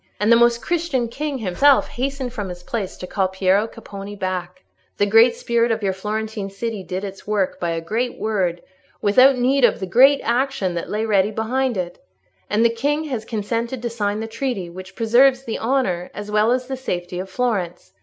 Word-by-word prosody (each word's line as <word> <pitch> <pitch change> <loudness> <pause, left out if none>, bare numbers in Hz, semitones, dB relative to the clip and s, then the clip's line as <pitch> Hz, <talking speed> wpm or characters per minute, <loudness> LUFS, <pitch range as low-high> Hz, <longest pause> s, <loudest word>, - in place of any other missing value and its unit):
And 210 +2 +2
the - - +8
Most 235 0 +3
Christian 315 -9 -1
King 285 +3 -3
himself 255 +7 +3
hastened 265 -1 -3
from 205 -6 -4
his 175 0 -8
place 205 -2 -4
to - - -7
call 190 0 0
Piero 190 +3 +1
Capponi 205 -3 -9
back. 185 - -4 0.3
The 205 - +3
great 225 +4 +5
spirit 235 0 +1
of 225 -1 -1
your 190 -1 +1
Florentine 210 +1 -4
city 210 +1 -4
did 185 +1 -4
its 195 0 -8
work 205 -3 0
by 170 - -1
a 165 0 -2
great 230 +9 -2
word, 185 -6 -1 0.4
without 255 +6 +5
need 260 +2 +2
of 235 - +4
the 190 - -3
great 265 +9 +5
actions 240 -6 0
that 170 - -4
lay 215 +1 -1
ready 200 -2 +3
behind 240 +3 -1
it. 175 -1 -4 0.5
And 215 +3 +2
the 230 - +4
King 290 +6 0
has 220 -3 -3
consented 230 +3 -3
to 235 - -2
sign 210 -2 -2
the - - -3
treaty, 225 -6 -3
which 185 +2 -10
preserves 250 +4 +4
the 230 - -4
honour, 225 -8 0
as 205 0 -6
well 215 +2 +3
as 255 0 0
the 265 +1 -5
safety, 180 -7 -4
of 190 +1 -5
Florence. 190 - -2
220 Hz, 200 wpm, -21 LUFS, 190-245 Hz, 0.5 s, the